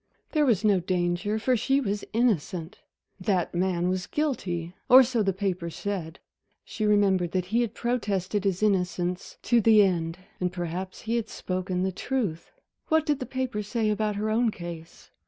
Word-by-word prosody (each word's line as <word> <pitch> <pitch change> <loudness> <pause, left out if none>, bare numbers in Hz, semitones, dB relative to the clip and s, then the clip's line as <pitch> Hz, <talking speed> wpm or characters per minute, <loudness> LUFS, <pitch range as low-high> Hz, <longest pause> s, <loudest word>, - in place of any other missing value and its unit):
There 300 -3 +2
was 220 -5 +2
no 205 -3 +4
danger, 180 +3 0
for 250 +3 +2
she 270 +4 +2
was 205 -6 -2
innocent. 190 -7 0 0.4
That 185 -2 0
man 180 0 0
was 185 -1 -1
guilty 180 - -2 0.2
or 260 +1 +10
so 240 -2 0
the 195 -2 +2
papers 185 -3 -3
said. 185 -6 -4 0.5
She 215 -2 -2
remembered 195 -4 +3
that 185 -1 0
he 235 - +4
had 230 -2 -2
protested 205 -5 -1
his 195 0 0
innocence 180 -3 0
to 240 -1 +3
the 215 -1 +6
end. 165 -3 0 0.2
And 180 -1 0
perhaps 180 +1 -5
he 230 +1 -1
had 225 -2 -3
spoken 185 0 -2
the 190 - 0
truth. 195 -5 -3 0.4
What 315 -1 +3
did 295 -2 +1
the 255 - -5
papers 250 -6 -3
say 220 -1 0
about 210 0 0
her 215 +1 -1
own 230 +1 +3
case? 170 -4 -9
200 Hz, 175 wpm, -27 LUFS, 180-225 Hz, 0.5 s, or